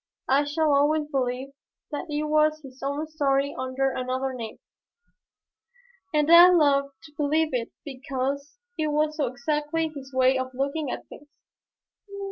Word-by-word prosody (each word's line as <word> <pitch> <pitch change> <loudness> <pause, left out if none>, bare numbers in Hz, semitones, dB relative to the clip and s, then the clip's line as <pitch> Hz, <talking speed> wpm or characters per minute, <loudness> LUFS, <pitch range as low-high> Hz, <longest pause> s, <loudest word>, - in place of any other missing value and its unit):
I 280 +2 +3
shall 300 +1 +1
always 295 +2 +3
believe 255 0 -1 0.4
that 300 +3 -5
it 295 0 -1
was 305 0 +2
his 260 -1 -13
own 285 +3 -2
story 280 -2 0
under 260 +1 -1
another 260 +1 -2
name, 230 -3 -7 1.5
and 300 +1 +2
I 345 +1 +10
love 280 -5 +3
to 310 - -14
believe 305 +2 +1
it 235 -2 -2
because 275 - -4 0.2
it 310 - +1
was 305 +1 0
so 290 -4 +1
exactly 300 +5 -1
his 280 -3 -10
way 260 0 +3
of 260 0 -5
looking 280 +2 -2
at - - -5
things. 290 - -14
280 Hz, 145 wpm, -25 LUFS, 265-305 Hz, 1.5 s, I